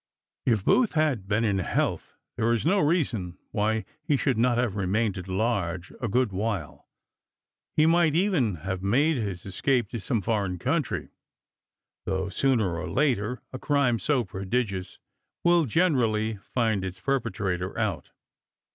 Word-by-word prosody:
If 110 Hz, -6 st, +2 dB
Booth 245 Hz, -4 st, +3 dB
had 150 Hz, -, +1 dB
been 105 Hz, +3 st, +1 dB
in 100 Hz, -4 st, +1 dB
health 90 Hz, -, -1 dB, 0.2 s
there 115 Hz, 0 st, +1 dB
is 115 Hz, -, -1 dB
no 195 Hz, +5 st, +3 dB
reason 125 Hz, -, 0 dB
why 110 Hz, 0 st, 0 dB, 0.2 s
he 150 Hz, -2 st, +1 dB
should 135 Hz, -1 st, +1 dB
not 120 Hz, 0 st, +3 dB
have 120 Hz, -5 st, 0 dB
remained 100 Hz, +1 st, 0 dB
at 90 Hz, -1 st, -7 dB
large 95 Hz, -3 st, -1 dB
a 120 Hz, -, 0 dB
good 120 Hz, +1 st, +1 dB
while; 100 Hz, -4 st, -3 dB, 0.9 s
he 155 Hz, -, +5 dB
might 165 Hz, -2 st, +4 dB
even 165 Hz, -, +2 dB
have 95 Hz, -1 st, -2 dB
made 135 Hz, +10 st, +2 dB
his 100 Hz, -6 st, -4 dB
escape 115 Hz, +4 st, 0 dB
to 115 Hz, -, -4 dB
some 110 Hz, +4 st, -1 dB
foreign 100 Hz, -3 st, -1 dB
country, -, -, -1 dB, 1.0 s
though, 95 Hz, 0 st, -1 dB
sooner 105 Hz, -6 st, +1 dB
or 90 Hz, -, -4 dB
later, 120 Hz, -, 0 dB
a 130 Hz, -, -5 dB
crime 135 Hz, -5 st, +2 dB
so 140 Hz, -2 st, +1 dB
prodigious 95 Hz, 0 st, -3 dB, 0.5 s
will 175 Hz, -2 st, +4 dB
generally 115 Hz, -7 st, +2 dB
find 110 Hz, -1 st, -1 dB
its 95 Hz, 0 st, -5 dB
perpetrator 105 Hz, -8 st, -2 dB
out. -, -, -2 dB
110 Hz, 145 wpm, -27 LUFS, 95-135 Hz, 1.0 s, he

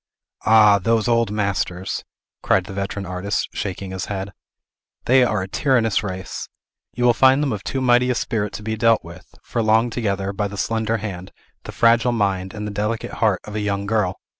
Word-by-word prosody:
"Ah, 105 Hz, -2 st, +6 dB
those 115 Hz, +3 st, +1 dB
old 115 Hz, -2 st, +2 dB
masters!" 100 Hz, -3 st, -2 dB, 0.4 s
cried 95 Hz, -, +2 dB
the 95 Hz, -, -8 dB
veteran 100 Hz, 0 st, -4 dB
artist, 95 Hz, +3 st, -2 dB
shaking 95 Hz, -1 st, -4 dB
his 95 Hz, 0 st, -4 dB
head. 100 Hz, 0 st, -5 dB, 0.7 s
"They 130 Hz, +1 st, +5 dB
are 105 Hz, -5 st, 0 dB
a -, -, -6 dB
tyrannous 115 Hz, +1 st, +1 dB
race! 95 Hz, -3 st, -6 dB, 0.5 s
You 125 Hz, -, -2 dB
will 120 Hz, -1 st, +5 dB
find 130 Hz, +4 st, +4 dB
them 135 Hz, -5 st, 0 dB
of 105 Hz, -, -5 dB
too 135 Hz, -, -3 dB
mighty 125 Hz, 0 st, +4 dB
a 125 Hz, -, +1 dB
spirit 105 Hz, -3 st, -2 dB
to 105 Hz, -, -7 dB
be 110 Hz, +1 st, -2 dB
dealt 115 Hz, 0 st, +3 dB
with, 85 Hz, +2 st, -13 dB
for 115 Hz, -, -2 dB
long 110 Hz, +2 st, +3 dB
together, 100 Hz, -4 st, -2 dB
by 105 Hz, +1 st, -1 dB
the 100 Hz, 0 st, -8 dB
slender 110 Hz, +1 st, 0 dB
hand, 95 Hz, -3 st, -6 dB, 0.3 s
the -, -, -6 dB
fragile 115 Hz, +1 st, +3 dB
mind, 95 Hz, -4 st, -1 dB
and 105 Hz, 0 st, -5 dB
the 105 Hz, -, -4 dB
delicate 105 Hz, +3 st, -2 dB
heart, 105 Hz, -5 st, +2 dB
of 105 Hz, -, -9 dB
a 110 Hz, -, -2 dB
young 100 Hz, -1 st, -2 dB
girl. 105 Hz, -3 st, 0 dB
105 Hz, 195 wpm, -21 LUFS, 100-115 Hz, 0.7 s, Ah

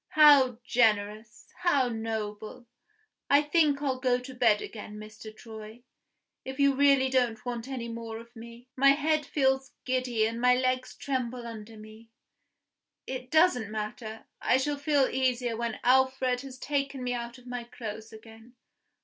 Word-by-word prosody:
How 285 Hz, -6 st, +7 dB
generous! 215 Hz, -2 st, 0 dB
how 285 Hz, -8 st, +2 dB
noble! 220 Hz, 0 st, -5 dB, 0.6 s
I 285 Hz, +1 st, +5 dB
think 295 Hz, -2 st, +2 dB
I'll 265 Hz, -2 st, -1 dB
go 250 Hz, -1 st, +2 dB
to 250 Hz, +1 st, -9 dB
bed 230 Hz, -4 st, +3 dB
again, 210 Hz, -1 st, -8 dB
Mr. 215 Hz, +1 st, -10 dB
Troy, 220 Hz, +1 st, -11 dB, 0.6 s
if 265 Hz, +1 st, -7 dB
you 280 Hz, 0 st, +4 dB
really 275 Hz, -1 st, +4 dB
don't 245 Hz, -4 st, 0 dB
want 240 Hz, -1 st, -4 dB
any 255 Hz, -3 st, -5 dB
more 230 Hz, -1 st, -6 dB
of 235 Hz, +2 st, -13 dB
me. 235 Hz, +2 st, -12 dB
My 275 Hz, +1 st, +6 dB
head 305 Hz, 0 st, 0 dB
feels 265 Hz, -2 st, 0 dB
giddy 255 Hz, -4 st, 0 dB
and 230 Hz, +1 st, -3 dB
my 250 Hz, 0 st, +5 dB
legs 255 Hz, 0 st, -1 dB
tremble 255 Hz, -3 st, -3 dB
under 225 Hz, -1 st, -9 dB
me. 215 Hz, +1 st, -14 dB, 1.0 s
It 255 Hz, -1 st, -6 dB
doesn't 310 Hz, -, +3 dB
matter; 215 Hz, +1 st, -6 dB, 0.2 s
I -, -, +3 dB
shall 290 Hz, +2 st, -1 dB
feel 285 Hz, -2 st, +2 dB
easier 250 Hz, -2 st, 0 dB
when 230 Hz, -1 st, -3 dB
Alfred 260 Hz, 0 st, +3 dB
has 270 Hz, -2 st, -10 dB
taken 275 Hz, -1 st, -2 dB
me 245 Hz, 0 st, -1 dB
out 235 Hz, 0 st, -5 dB
of 250 Hz, -, -18 dB
my 245 Hz, -1 st, -5 dB
clothes 220 Hz, -2 st, -8 dB
again. 225 Hz, +2 st, -15 dB
245 Hz, 155 wpm, -28 LUFS, 225-265 Hz, 1.0 s, How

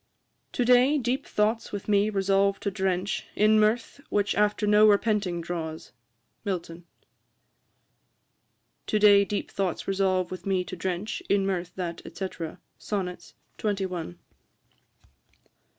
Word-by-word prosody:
'To 245 Hz, -, 0 dB
day 250 Hz, +4 st, +5 dB
deep 260 Hz, +2 st, -1 dB
thoughts 220 Hz, +2 st, 0 dB
with 205 Hz, -2 st, -6 dB
me 205 Hz, 0 st, +3 dB
resolve 195 Hz, 0 st, +2 dB
to 200 Hz, -, -2 dB
drench 190 Hz, 0 st, -1 dB
In 215 Hz, +1 st, +4 dB
mirth, 220 Hz, +5 st, +1 dB
which 205 Hz, 0 st, +1 dB
after 210 Hz, +1 st, +1 dB
no 210 Hz, +1 st, +6 dB
repenting 200 Hz, -4 st, +1 dB
draws.' 165 Hz, -2 st, -5 dB, 0.5 s
MILTON. 175 Hz, -4 st, -4 dB, 2.0 s
['To 215 Hz, -, +1 dB
day 205 Hz, -1 st, +7 dB
deep 205 Hz, +1 st, -4 dB
thoughts 190 Hz, -4 st, -2 dB
resolve 190 Hz, -2 st, +1 dB
with 185 Hz, -, -6 dB
me 190 Hz, -2 st, +1 dB
to 185 Hz, -, -7 dB
drench 185 Hz, +3 st, -3 dB
In 200 Hz, -1 st, +3 dB
mirth 180 Hz, -2 st, -2 dB
that, 170 Hz, -2 st, -4 dB, 0.2 s
&c.' 190 Hz, -1 st, -2 dB, 0.5 s
Sonnets, 185 Hz, -4 st, -4 dB, 0.2 s
xxi. 190 Hz, -, -2 dB
200 Hz, 120 wpm, -27 LUFS, 185-210 Hz, 2.0 s, day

